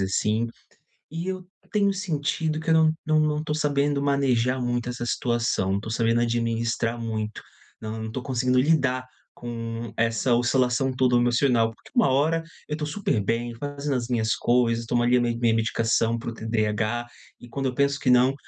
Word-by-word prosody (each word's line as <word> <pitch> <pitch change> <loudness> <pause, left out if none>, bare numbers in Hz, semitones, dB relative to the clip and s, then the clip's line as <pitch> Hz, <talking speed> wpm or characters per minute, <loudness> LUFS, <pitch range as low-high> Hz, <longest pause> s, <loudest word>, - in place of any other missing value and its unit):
assim, 105 +4 +1 0.7
e 165 +2 -4
eu 185 -1 -4 0.3
tenho 200 -2 +2
sentido 160 -4 -1
que 160 - -4
eu - - +5
não 160 -1 +4
não 155 0 +3
não 150 0 +1
tô 150 -1 -2
sabendo 145 -1 +1
manejar 130 -3 +1
muito 120 0 -1
essa 120 -1 -4
situação, 120 -6 0
não 100 - 0
tô 110 - -7
sabendo 115 +1 +1
administrar 115 0 0
muito, 110 -2 -4 0.4
não 110 0 -5
não 110 - -5
tô 130 - -4
conseguindo 125 0 +1
lidar 130 -3 +2 0.3
com 115 -1 -6
essa 115 +2 +1
oscilação 125 +2 +2
toda 125 -1 +3
emocional. 120 -2 +2
Porque - - -20
uma 235 - +4
hora, 155 +5 +2 0.3
eu 150 - -2
tô 150 - -3
super 150 - -1
bem 120 +3 -1
fazendo 145 +2 -3
as 120 -1 -2
minhas 115 -3 +1
coisas, 115 -1 +1
tomo 120 +1 +1
ali 125 +1 +4
a - - +2
mi 120 -1 0
minha 115 -1 +2
medicação 115 0 +1
para 115 - -5
o - - -6
TDAH, 110 +1 -1 0.3
e 120 - -13
quando 135 +3 -3
eu 125 - -3
penso 140 +1 +1
que 130 - 0
não, 125 +2 +5
120 Hz, 185 wpm, -25 LUFS, 115-140 Hz, 0.7 s, eu